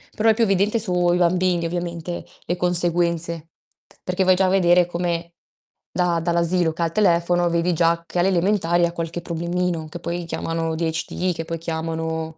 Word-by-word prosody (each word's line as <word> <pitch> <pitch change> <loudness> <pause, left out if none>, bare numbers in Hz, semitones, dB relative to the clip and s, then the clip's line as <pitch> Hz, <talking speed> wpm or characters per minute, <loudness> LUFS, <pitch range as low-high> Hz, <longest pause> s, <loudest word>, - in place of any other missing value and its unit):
Però 225 +1 +3
è - - +6
più 230 +1 +1
evidente 200 +2 +2
sui 180 -3 +1
bambini 180 -1 +2
ovviamente, 175 0 -4 0.2
le 175 - -1
conseguenze, 170 -2 +1 0.5
perché 180 +1 0
vai 185 0 +5
già 190 +1 +2
a - - +2
vedere 180 -2 +4
come 170 -1 -3 0.6
da 175 -2 +1
dall'asilo 170 0 +1
che 170 - -6
ha - - +3
il 165 - -2
telefono, 175 -2 +2
vedi 170 +1 +1
già 170 0 +1
che 175 - -3
alle 175 - +3
elementari 175 -2 +2
ha 170 - -2
qualche 170 0 -4
problemino 170 -1 -2
che 175 - -8
poi 170 +1 -4
chiamano 165 0 -3
ADHD, 165 +2 -2
che 165 -1 -5
poi 165 0 -4
chiamano 160 0 -4
170 Hz, 175 wpm, -22 LUFS, 165-180 Hz, 0.6 s, è